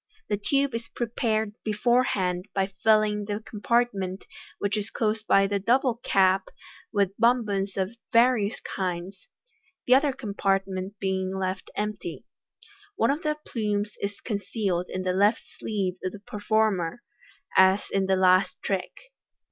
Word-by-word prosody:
The 205 - +1
tube 275 +5 +1
is 230 0 -4
prepared 220 -2 -1
beforehand 210 -5 +1
by 195 0 0
filling 215 -1 +3
the 205 0 -3
compartment 210 -4 -1 0.3
which 200 +1 -1
is 210 -1 -3
closed 220 -1 -1
by 195 0 +5
the 200 0 0
double 240 +3 +2
cap 190 0 +3 0.4
with 200 -3 +1
bonbons 210 -5 +2
of 190 +4 -1 0.2
various 230 -2 +3
kinds; 185 - -4 0.6
the 250 - +5
other 280 +2 +4
compartment 195 -4 -2
being 190 0 -1
left 185 0 -3
empty. 210 0 -4 0.7
One 230 -7 +3
of 295 +3 -2
the 300 -1 -1
plumes 210 -2 -1
is 200 0 -4
concealed 200 -4 -2
in 185 - -3
the 185 0 0
left 205 +4 +3 0.2
sleeve 190 -4 -2
of 185 - -2
the 210 - -9
performer, 210 -1 0 0.5
as 190 +1 +5
in 195 -1 +1
the 190 - +3
last 185 0 +4
trick. 190 -2 -2
205 Hz, 140 wpm, -26 LUFS, 190-225 Hz, 0.7 s, by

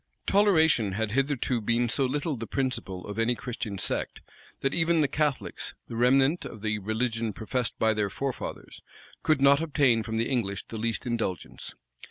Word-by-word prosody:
Toleration 160 - +4
had 110 +1 -1
hitherto 130 -1 0
been 115 +3 +1
so 135 +4 +1
little 145 +3 -1
the 115 -2 -6
principle 115 -9 -3
of 105 +2 -5
any 115 +2 +2
Christian 110 -3 -5
sect, - - -2 0.4
that 135 - +1
even 165 -1 +3
the 145 - +3
Catholics, 145 -1 -2
the 115 - -7
remnant 135 +7 +3
of 110 -2 -9
the 105 -1 0
religion 110 +1 -1
professed 115 +2 -2
by 110 0 +3
their 105 -2 0
forefathers, 135 +6 -5 0.4
could 155 -3 +2
not 140 +2 +6
obtain 140 -7 +3
from 110 +1 -3
the 115 - +1
English 105 -7 -1
the 110 - -5
least 115 +2 -2
indulgence. 115 -8 -3
120 Hz, 170 wpm, -28 LUFS, 110-140 Hz, 0.4 s, not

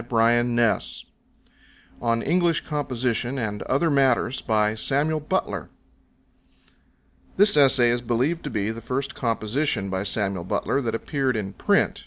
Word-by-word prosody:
Bartholomew 120 +1 +2
266 120 -2 0 0.9
On 115 -1 +1
English 170 -2 +2
Composition 130 -4 -2
and 105 -4 -3
Other 150 +5 +1
Matters 135 -2 +2 3.0
This 205 +1 +5
essay 130 -4 +5
is 120 0 -1
believed 125 +8 -1
to - - -3
be 110 -3 -2
the 115 +1 -8
first 135 +4 -3
composition 115 -2 -1
by 95 0 -1
Samuel 100 -2 -2
Butler 135 +9 -1
that 115 -3 -2
appeared 135 +1 -1
in 95 -2 -4
print. - - +1
120 Hz, 120 wpm, -24 LUFS, 115-140 Hz, 3.0 s, This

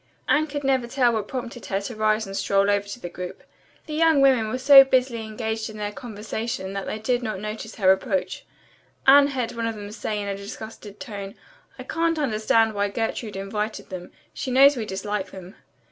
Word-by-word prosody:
Anne 310 +1 +3
could 290 -1 -5
never 265 -3 +1
tell 245 -1 +2
what 215 -2 -2
prompted 245 -2 -6
her 195 - 0
to 210 +4 -6
rise 215 0 +1
and 195 0 -7
stroll 200 +1 +2
over 200 0 0
to 205 +4 -7
the 175 - -6
group. 180 +1 -8 0.4
The 310 - -7
young 320 -1 +4
women 260 -5 +4
were 255 - -2
so 270 +1 +9
busily 255 -3 +1
engaged 220 0 -4
in 215 - -9
their 205 -1 -3
conversation 215 -3 -5
that 195 -1 -4
they - - -3
did 245 +3 0
not 215 -5 -3
notice 215 +1 -6
her 190 -3 +4
approach. 190 0 -1 0.6
Anne 280 +1 +8
heard 255 -4 -2
one 230 -1 -3
of 225 - -3
them 205 -1 -8
say 210 -1 -3
in 200 - -4
a 200 - -2
disgusted 205 +1 -9
tone, 200 -2 -7 0.4
"I - - -7
can't 330 0 0
understand 225 -4 +2
why 205 0 0
Gertrude 225 0 -3
invited 210 +2 -4
them. 180 -1 -7 0.2
She - - -4
knows 275 +3 +6
we 225 -4 -4
dislike 200 0 -3
them." 185 0 -11
220 Hz, 205 wpm, -24 LUFS, 205-250 Hz, 0.6 s, so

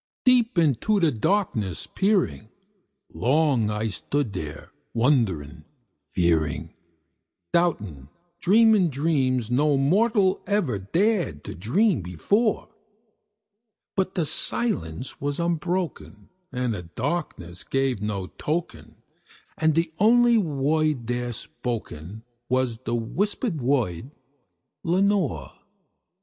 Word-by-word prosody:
Deep 250 -4 +4
into 170 - +2
that 150 - +1
darkness 110 - 0
peering, 190 - 0 0.6
long 135 -4 +2
I 105 +1 -2
stood 125 +3 -2
there 75 -5 -7 0.2
wondering, 110 - +1 0.5
fearing, 80 -3 0 0.8
Doubting, 105 - 0 0.3
dreaming 215 -1 +5
dreams 130 -5 0
no 145 +3 +3
mortal 195 - +2
ever 170 - 0
dared 170 - 0
to - - -6
dream 160 - +1
before; 200 - 0 1.3
But 190 -1 -1
the 170 - +1
silence 125 - -2
was 145 +2 -2
unbroken, 170 +1 -2 0.2
and 125 -2 -1
the 95 - -5
darkness 90 - -4
gave 135 -5 0
no 105 -3 -2
token, 160 - -4 0.6
And 160 -1 +2
the 165 -1 0
only 235 +2 +5
word 150 - 0
there 120 +1 -2
spoken 110 -5 -6 0.3
was 130 -3 0
the 120 - -1
whispered 180 - -2
word, 120 -5 0 0.7
"Lenore!" 190 - +1
140 Hz, 100 wpm, -25 LUFS, -, 1.3 s, dreaming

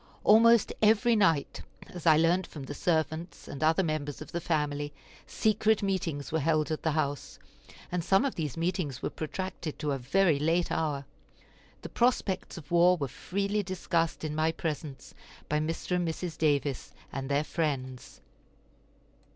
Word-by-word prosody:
Almost 230 +1 +6
every 220 +2 +4
night, 165 -9 +2 0.2
as 175 -2 -7
I 155 -1 +7
learned 170 +3 +2
from 145 - -9
the 140 - -6
servants 160 +1 -2
and 140 - -5
other 160 +4 +3
members 155 -3 -3
of 155 0 -9
the 170 - -3
family, 145 -3 -1 0.4
secret 220 0 +2
meetings 170 -7 -2
were 160 - +1
held 155 +1 +1
at 155 - -2
the 160 - 0
house; 145 -3 -2 0.5
and 180 -1 -1
some 195 +8 +3
of 275 - -1
these 150 -5 -4
meetings 165 -6 -2
were - - -1
protracted 170 0 -5
to 150 -2 -2
a 135 - -1
very 155 +4 +2
late 165 +4 +1
hour. 150 -4 -1 0.8
The - - -6
prospects 235 -8 0
of 155 -2 -11
war 175 +1 +5
were 140 -4 -2
freely 200 - -2
discussed 170 -5 -1
in 155 -1 -3
my 155 +1 +1
presence 155 -4 -5 0.3
by 150 - +1
Mr. 165 +3 -2
and 175 -1 -1
Mrs. 165 +1 -4
Davis 145 -4 0 0.2
and 135 0 -4
their 145 +1 +2
friends. 135 -6 -3
160 Hz, 160 wpm, -29 LUFS, 150-180 Hz, 0.8 s, I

